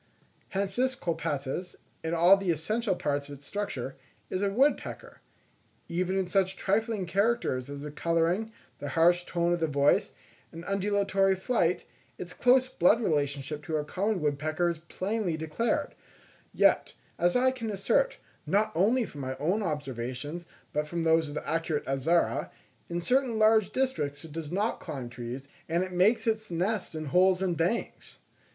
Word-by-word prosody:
Hence 195 0 -2
this 260 +1 +1
Colaptes, 160 - -3 0.3
in 165 +1 -1
all 175 +4 +7
the 195 -2 -3
essential 195 +6 0
parts 145 -3 -2
of 145 - -8
its 140 - -18
structure, 135 -11 -4 0.3
is 185 - -1
a 200 - +2
woodpecker. 270 +8 0 0.7
Even 185 +2 -1
in 190 - +1
such 190 +1 +1
trifling 210 0 0
characters 190 - 0
as 140 0 -6
the 150 - -6
colouring, 170 +7 0 0.3
the 145 - -4
harsh 175 +2 +4
tone 170 0 +1
of 175 - 0
the 165 - +1
voice, 140 -1 +2 0.4
and 165 +1 -9
undulatory 195 -1 +2
flight, 185 -3 0 0.3
its 180 0 -7
close 255 +1 +4
blood 210 -1 +4
relationship 145 - -1
to 160 - -2
our 150 - 0
common 195 +5 -1
woodpecker 155 +4 0
is 170 -2 -3
plainly 185 +1 -2
declared; 230 - -1 0.6
yet, - - +3 0.2
as 175 0 +3
I 255 +1 +4
can 235 -4 -5
assert, - - +1 0.3
not 215 +2 +2
only 230 +7 +3
from 145 -7 -9
my 130 0 -4
own 175 +10 0
observations, 145 - -4 0.3
but 150 0 0
from 170 +1 -2
those 160 -1 +3
of 145 - -7
the - - -5
accurate 165 -1 -1
Azara, 140 +6 +1 0.4
in 170 0 -2
certain 250 +3 +1
large 215 -1 +5
districts 165 - -1
it 160 - -11
does 160 0 -6
not 205 +5 0
climb 135 -7 -6
trees, 120 +3 -6 0.2
and 170 +2 +2
it 185 - -5
makes 190 +6 +3
its 220 -1 0
nest 185 +2 -1
in 155 0 -4
holes 180 +5 +3
in 180 -2 +1
banks! 170 +8 -2
175 Hz, 165 wpm, -29 LUFS, 150-205 Hz, 0.7 s, all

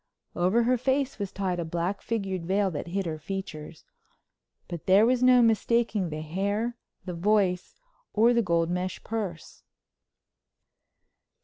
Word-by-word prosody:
Over 185 +7 +2
her 250 +1 +2
face 265 0 0
was 200 -2 -3
tied 185 -3 -2
a - - -1
black 170 +4 -2
figured 195 -6 -3
veil 195 0 +1
that 150 +1 -5
hid 190 +2 -2
her 155 -2 -4
features, 155 -3 -7 0.8
but 170 -3 -7
there 195 +3 +6
was 250 +1 +2
no 250 -1 +6
mistaking 225 -3 +1
the 155 0 -5
hair, 200 +8 -2 0.3
the 180 - -4
voice, 185 - 0 0.3
or 230 +3 +4
the 235 - +3
gold 170 -4 +1
mesh 180 +1 -3
purse. 200 -8 -5
195 Hz, 140 wpm, -27 LUFS, 175-225 Hz, 0.8 s, there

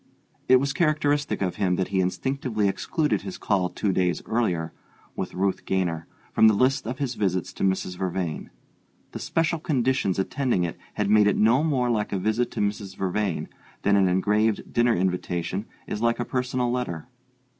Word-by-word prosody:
It 130 - +8
was 135 +2 +2
characteristic 145 - +1
of 90 - -2
him 90 -2 +1
that 95 0 -1
he 95 -1 0
instinctively 110 +3 0
excluded 150 - 0
his 185 -2 -6
call 95 -3 0
two 100 - -1
days 90 -1 0
earlier, 90 -9 -1 0.4
with - - -4
Ruth 95 +1 0
Gaynor, 85 -4 -1 0.3
from 110 - +6
the 110 - +5
list 130 +3 +2
of 125 +3 -3
his 135 -3 -2
visits 95 -5 -1
to - - -5
Mrs. 95 -1 0
Vervain: 90 -4 -3 0.6
the - - -6
special 165 0 0
conditions 130 - +1
attending 110 0 0
it 85 - -2 0.2
had 105 -1 0
made 105 -1 +6
it 105 - +2
no 120 +7 +4
more 130 -6 +1
like 105 -2 -1
a 100 - 0
visit 110 +5 0
to - - -4
Mrs. 100 -2 -2
Vervain 95 -1 -1 0.4
than 100 0 +4
an 95 -1 +4
engraved 105 +4 +1
dinner 120 0 +3
invitation 90 +2 -2 0.2
is 105 - -4
like 115 0 +2
a 120 - -1
personal 125 -1 -1
letter. 120 -11 -3
105 Hz, 175 wpm, -25 LUFS, 95-125 Hz, 0.6 s, It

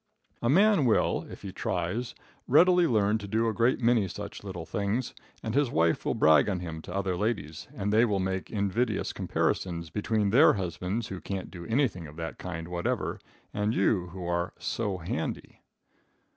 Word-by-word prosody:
A 120 - +1
man 195 - +5
will, 115 - +2
if - - -11
he 95 - -5
tries, 95 +6 -2 0.3
readily 175 +5 +5
learn 110 -3 +2
to 100 - -7
do 110 +3 +1
a 110 - 0
great 115 +5 +2
many 115 -4 +3
such 90 - -7
little 90 -4 -6
things 105 +8 -2 0.3
and 110 - -3
his 140 -1 +2
wife 85 -5 +2
will - - 0
brag 80 +5 +5
on 95 -3 -1
him 80 -2 -6
to 90 - -10
other 95 -2 0
ladies, 90 -7 -3
and 105 +1 -1
they 110 +2 +5
will 105 -4 +2
make 95 0 -2
invidious 105 +4 -1
comparisons 85 -3 -1
between 105 0 0
their 140 +8 +7
husbands 95 +3 -3
who 95 -1 -6
can't 95 -2 -5
do 85 -2 -8
anything 115 - 0
of 75 - -12
that 80 0 -6
kind 85 -2 -5
whatever, 85 -1 -2 0.3
and 105 +2 0
you 95 -1 +2
who 90 +1 -7
are 85 0 -1
"so 110 -3 -2
handy." 85 -1 -5
100 Hz, 180 wpm, -28 LUFS, 90-115 Hz, 0.3 s, their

